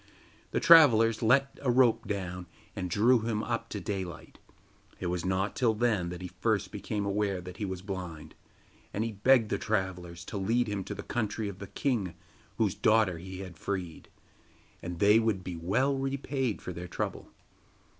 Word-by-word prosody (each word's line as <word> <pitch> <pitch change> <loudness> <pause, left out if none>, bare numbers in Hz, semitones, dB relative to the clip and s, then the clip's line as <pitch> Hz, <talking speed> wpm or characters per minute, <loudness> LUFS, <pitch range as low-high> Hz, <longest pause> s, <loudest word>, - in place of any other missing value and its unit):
The - - 0
travellers 115 -9 +7
let 135 +4 +3
a 135 - 0
rope 120 -2 +4
down 90 -3 -4 0.3
and 90 -2 -3
drew 115 +7 +4
him 110 -1 -2
up 115 -1 -3
to - - -4
daylight. 95 -5 -6 0.6
It - - -5
was 90 -2 -2
not 95 +2 -1
till 115 -4 +2
then 105 -6 +1
that 90 +1 -7
he 90 - -6
first 105 -3 0
became 105 0 -3
aware 100 -1 0
that 90 +1 -9
he 105 - -2
was 95 -1 -5
blind, 90 -6 -6 0.6
and 105 - 0
he 115 - -2
begged 110 +2 +4
the - - 0
travellers 90 -4 -3
to 105 - -5
lead 115 +6 +1
him 100 -2 -2
to - - -5
the - - -7
country 110 -2 -2
of 95 -1 -9
the 100 - -7
king 100 - -1 0.4
whose - - +2
daughter 110 -6 +3
he 95 +2 -8
had 90 -4 -9
freed, 90 -5 -4 0.7
and 90 -1 -5
they 105 +4 +5
would 110 -5 0
be 90 -2 -5
well 105 +12 +1
repaid 135 -3 -2
for 90 - -5
their 90 +1 -7
trouble. - - -4
100 Hz, 180 wpm, -30 LUFS, 90-115 Hz, 0.7 s, travellers